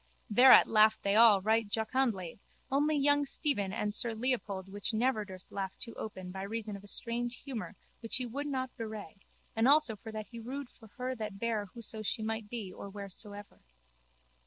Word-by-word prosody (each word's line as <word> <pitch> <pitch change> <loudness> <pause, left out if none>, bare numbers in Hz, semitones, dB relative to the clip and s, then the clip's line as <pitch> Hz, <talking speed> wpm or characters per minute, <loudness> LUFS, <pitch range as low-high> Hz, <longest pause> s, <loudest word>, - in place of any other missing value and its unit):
Thereat 250 +4 +8
laughed 215 0 +4
they 200 0 +2
all 215 -4 +7
right 220 0 +2
jocundly 220 -5 -1 0.3
only 295 +3 +2
young 290 +1 +4
Stephen 270 -8 0
and 210 0 -1
sir 230 +1 +1
Leopold 220 -6 -2
which 205 +3 -3
never 230 -1 +2
durst 190 -2 -10
laugh 195 -1 -4
too 230 - -7
open 185 -4 -7
by 190 +1 -6
reason 215 +1 -4
of 200 - -10
a - - -13
strange 240 +3 -3
humour 235 -6 -5 0.2
which 225 -1 -3
he 255 - -1
would 280 +5 -4
not 260 -2 -3
bewray 215 -6 -7 0.4
and 225 +2 +3
also 285 -5 +5
for 220 +2 -9
that 215 -1 -5
he 235 - -7
rued 260 +3 -6
for 225 - -16
her 255 0 -2
that 215 -5 -5
bare 220 -1 -1
whoso 225 -1 -7
she 215 +1 -2
might 220 -1 -3
be 210 -6 -5
or 200 - -8
wheresoever. 205 +1 -8
220 Hz, 185 wpm, -32 LUFS, 205-245 Hz, 0.4 s, Thereat